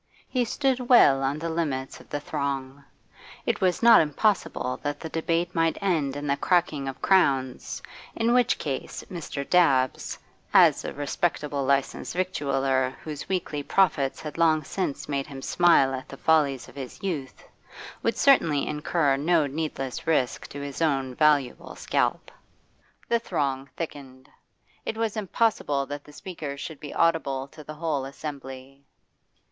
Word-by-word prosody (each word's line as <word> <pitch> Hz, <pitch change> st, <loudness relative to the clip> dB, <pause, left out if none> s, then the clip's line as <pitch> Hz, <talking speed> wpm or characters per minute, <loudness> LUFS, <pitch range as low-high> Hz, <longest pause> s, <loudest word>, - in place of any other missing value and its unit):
He 250 Hz, -2 st, 0 dB
stood 255 Hz, 0 st, -1 dB
well 140 Hz, -, +7 dB
on 135 Hz, +2 st, 0 dB
the 165 Hz, +2 st, -4 dB
limits 145 Hz, -5 st, -2 dB
of -, -, -17 dB
the 145 Hz, -, -2 dB
throng; 140 Hz, -2 st, -4 dB, 0.6 s
it -, -, 0 dB
was 185 Hz, +3 st, +1 dB
not 230 Hz, -1 st, +9 dB
impossible 155 Hz, -, 0 dB
that 145 Hz, 0 st, -3 dB
the 160 Hz, -, -6 dB
debate 165 Hz, +2 st, -1 dB
might 165 Hz, -1 st, +1 dB
end 160 Hz, -9 st, 0 dB
in 145 Hz, 0 st, -5 dB
the 140 Hz, -1 st, +1 dB
cracking 160 Hz, -6 st, +1 dB
of 135 Hz, -, -7 dB
crowns, 135 Hz, -9 st, +1 dB, 0.3 s
in 230 Hz, +1 st, +2 dB
which 250 Hz, -1 st, +3 dB
case 135 Hz, -3 st, -4 dB
Mr. 150 Hz, -5 st, -5 dB
Dabbs, 135 Hz, -8 st, +2 dB, 0.4 s
as -, -, +6 dB
a -, -, -4 dB
respectable 145 Hz, 0 st, -2 dB
licensed 140 Hz, +4 st, 0 dB
victualler 135 Hz, -7 st, 0 dB
whose 150 Hz, -2 st, -7 dB
weekly 175 Hz, -6 st, -2 dB
profits 145 Hz, -5 st, +1 dB
had 155 Hz, +1 st, -7 dB
long 160 Hz, -2 st, +4 dB
since 145 Hz, 0 st, -3 dB
made 140 Hz, -1 st, -2 dB
him 135 Hz, -3 st, -9 dB
smile 170 Hz, -6 st, +4 dB
at 130 Hz, 0 st, -6 dB
the 135 Hz, -, -9 dB
follies 145 Hz, -5 st, +2 dB
of -, -, -14 dB
his 135 Hz, +3 st, -8 dB
youth, 155 Hz, -9 st, -4 dB, 0.6 s
would -, -, 0 dB
certainly 160 Hz, -, +4 dB
incur 150 Hz, -1 st, +1 dB
no 160 Hz, +2 st, +3 dB
needless 140 Hz, -3 st, -4 dB
risk 140 Hz, -6 st, +1 dB
to 140 Hz, -, -8 dB
his 140 Hz, +2 st, -6 dB
own 135 Hz, -5 st, +1 dB
valuable 145 Hz, -2 st, +1 dB
scalp. -, -, -1 dB, 0.8 s
The 235 Hz, -, +2 dB
throng 140 Hz, -10 st, -2 dB
thickened; 135 Hz, -5 st, -7 dB, 0.5 s
it 220 Hz, -, -4 dB
was 225 Hz, -1 st, -1 dB
impossible 205 Hz, -9 st, 0 dB
that 145 Hz, +1 st, -6 dB
the 150 Hz, -, -14 dB
speakers 150 Hz, -4 st, -7 dB
should 155 Hz, 0 st, -7 dB
be 145 Hz, -, -8 dB
audible 140 Hz, -5 st, +1 dB
to 155 Hz, -, -12 dB
the 155 Hz, +1 st, -8 dB
whole 150 Hz, -4 st, -2 dB
assembly. 135 Hz, -1 st, -8 dB
145 Hz, 150 wpm, -26 LUFS, 135-170 Hz, 0.8 s, not